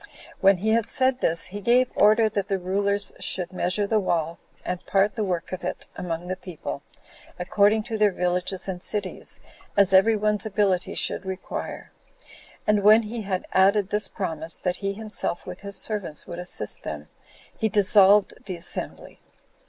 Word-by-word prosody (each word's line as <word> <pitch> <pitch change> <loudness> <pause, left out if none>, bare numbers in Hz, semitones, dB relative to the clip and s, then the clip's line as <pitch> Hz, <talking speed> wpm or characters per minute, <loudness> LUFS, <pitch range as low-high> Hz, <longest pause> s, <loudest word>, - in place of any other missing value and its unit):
When 195 0 +5
he 210 +5 -1
had 230 -1 +2
said 260 -1 +1
this, 165 -8 0
he 205 - -5
gave 245 +4 +3
order 215 +2 +5
that 200 -2 -2
the 195 - 0
rulers 200 +2 -1
should 180 0 0
measure 185 +3 0
the 215 +1 +2
wall, 170 -4 -1 0.3
and 180 0 -3
part 195 +1 +2
the 220 - -2
work 180 -4 -3
of 185 -1 -5
it 180 - -4
among 170 -1 -4
the 185 +1 -3
people, 165 -6 -7 0.6
according 205 +4 +2
to 220 -1 -4
their 210 -1 +5
villages 180 +1 -2
and 180 -2 -4
cities, 200 -1 -3 0.4
as 195 -1 +5
every 195 +4 +6
one's 210 0 0
ability 200 -4 0
should - - +1
require. 190 0 -6 0.7
And 210 -1 +3
when 215 +3 +6
he 225 +2 -5
had 190 -3 -3
added 195 +1 +3
this 210 0 +1
promise, 160 -4 -3
that 180 0 -2
he 195 -1 -2
himself, 215 -4 -2
with 180 0 -8
his 200 0 -2
servants, 200 -8 -2
would 170 - -7
assist 180 - -3
them, - - -6 0.5
he 220 - 0
dissolved 205 -1 +5
the 185 - -3
assembly. 170 - -6
195 Hz, 170 wpm, -25 LUFS, 180-210 Hz, 0.7 s, every